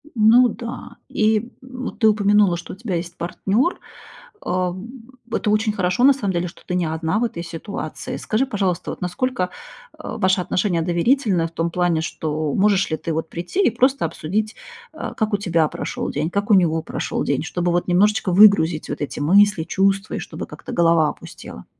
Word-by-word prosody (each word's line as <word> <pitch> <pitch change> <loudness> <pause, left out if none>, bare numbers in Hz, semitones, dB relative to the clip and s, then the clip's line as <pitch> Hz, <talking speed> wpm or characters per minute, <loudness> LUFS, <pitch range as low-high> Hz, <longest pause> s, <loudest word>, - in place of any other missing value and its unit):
Ну 235 +3 +6
да, 235 +2 -8
и, 220 +2 +1
м, 255 -1 -7
ты 220 - +4
упомянула, 205 -3 +3
что 175 - -8
у - - -8
тебя 200 -2 -4
есть 170 0 -4
партнер, 205 - 0 0.7
э, 180 0 0 0.6
это 210 - -1
очень 215 +1 +2
хорошо, 190 +3 0
на 280 - +8
самом 205 -8 -2
деле, 175 0 -1
что - - -17
ты 180 - -2
не 180 -2 +1
одна 160 +5 -1
в 240 - 0
этой 190 -8 -3
ситуации. 165 +4 -6
Скажи, 225 +5 0
пожалуйста, 195 -8 -2
вот, - - -8
насколько, 180 +2 -1 0.5
а, 220 - -6
ваши 185 -2 +2
отношения 180 -2 0
доверительны 175 +1 +1
в - - -15
том 165 0 -2
плане, 175 -2 +1
что 155 -2 -3
можешь 195 -1 +2
ли 155 - 0
ты, 165 - -4
вот, 160 +1 -3
прийти 175 - -2
и - - +5
просто 255 -2 +1
обсудить, 205 +7 -3 0.4
э, - - -6
как 220 -1 -1
у 205 - +3
тебя 170 -6 +1
прошел - - -4
день, 155 +3 -2
как 200 +3 -1
у - - +7
него 165 -4 +3
прошел - - -3
день, 140 +1 -1
чтобы, 175 +1 -1
вот 175 +1 0
немножечко 195 +1 +2
выгрузить 180 -5 +5
вот - - -4
эти 145 - -4
мысли, 195 +3 +4
чувства, 195 +4 0
и - - -3
чтобы - - -7
как-то - - -9
голова 165 -2 +4
опустела. 60 - -10
185 Hz, 190 wpm, -21 LUFS, 170-215 Hz, 0.7 s, на